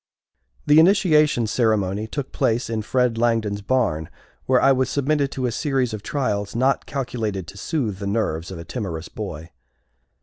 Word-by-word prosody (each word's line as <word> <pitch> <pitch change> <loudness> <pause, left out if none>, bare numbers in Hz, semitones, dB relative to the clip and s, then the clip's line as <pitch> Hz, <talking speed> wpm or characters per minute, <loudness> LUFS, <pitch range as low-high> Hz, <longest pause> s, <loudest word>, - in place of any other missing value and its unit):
The 150 +1 +6
initiation 160 - +4
ceremony 110 -2 0
took 140 +3 -5
place 115 0 0
in 110 -1 -1
Fred 125 +1 0
Langdon's 115 -3 +1
barn, 100 -9 0 0.4
where 130 -1 +4
I 135 - +5
was 130 -1 +1
submitted 140 0 0
to 130 - -2
a 120 - 0
series 135 -2 0
of 105 - -5
trials 105 -6 -2
not 130 +3 +1
calculated 115 -8 -3
to 100 - -11
soothe 115 - -2
the 100 - -4
nerves 100 -6 -1
of 95 - -7
a 85 - -8
timorous 90 -6 -5
boy. 85 -6 -7
115 Hz, 165 wpm, -22 LUFS, 100-135 Hz, 0.4 s, The